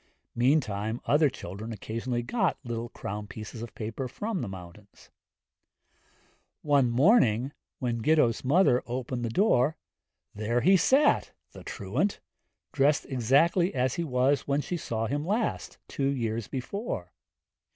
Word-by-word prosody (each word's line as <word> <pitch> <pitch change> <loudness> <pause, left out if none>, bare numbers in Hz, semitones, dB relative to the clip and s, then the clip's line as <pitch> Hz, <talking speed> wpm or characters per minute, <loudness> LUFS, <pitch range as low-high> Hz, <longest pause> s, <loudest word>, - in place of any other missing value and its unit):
Meantime 120 -4 +1
other 150 +1 +4
children 105 -1 -7
occasionally 115 +3 -3
got 195 - 0
like 120 -1 -4
crown 105 +1 -5
pieces 110 +2 -8
of 115 - -8
paper 115 +4 -4
from 205 - -3
the 120 - -3
mountains. 95 +2 -12 1.5
One 140 -4 +3
morning 130 - +4 0.3
when 120 -3 -2
Gitto's 150 -4 +3
mother 135 -2 +4
opened 125 0 -3
the 115 - -1
door 155 - +2 0.6
there 110 +3 -1
he 190 +7 +5
sat 270 - +3 0.2
the - - -12
truant! - - -2 0.5
dressed 145 +1 +2
exactly 145 - +2
as 130 0 +1
he 170 - -2
was 135 -1 +1
when 140 +1 +1
she 180 - -4
saw 115 -8 -3
him 145 +6 -2
last, 215 +7 -2
two 135 - -1
years 115 -5 -2
before. 130 - -5
125 Hz, 130 wpm, -28 LUFS, 115-150 Hz, 1.5 s, he